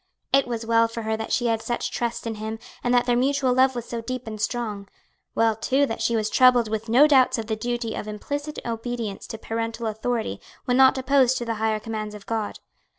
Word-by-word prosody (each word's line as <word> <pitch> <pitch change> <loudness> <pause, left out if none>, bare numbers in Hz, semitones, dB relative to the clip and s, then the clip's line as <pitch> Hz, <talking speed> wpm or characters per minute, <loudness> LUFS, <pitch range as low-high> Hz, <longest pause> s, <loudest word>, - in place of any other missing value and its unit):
It 275 -1 +4
was 230 -2 -3
well 230 0 +4
for 230 0 -6
her 220 0 0
that 220 0 -5
she 240 - +1
had 225 -1 +1
such 240 +1 -2
trust 235 -1 -3
in 230 - -2
him 220 +1 -4 0.3
and 245 - +1
that 245 0 +4
their 245 -1 +2
mutual 265 +1 +2
love 260 +1 +4
was 240 -1 -4
so 235 -1 -5
deep 255 +2 -5
and 215 -2 -6
strong; 215 -3 -2 0.5
well 225 -1 +3
too 265 +6 +2
that 225 - -4
she 235 - +1
was 215 -1 +1
troubled 245 0 +5
with 220 +1 -3
no 255 +6 +7
doubts 260 -3 +4
of 225 - -3
the 220 0 -2
duty 235 0 -3
of - - -5
implicit 285 +8 -5
obedience 230 -2 -4
to 225 - -6
parental 225 +1 -4
authority 225 +1 -2 0.2
when 250 -3 +1
not 265 +1 +6
opposed 260 -1 +3
to 240 - -3
the 230 - -1
higher 220 -1 +1
commands 215 -1 -5
of 205 - -11
God. 220 -2 -3
230 Hz, 225 wpm, -24 LUFS, 220-250 Hz, 0.5 s, no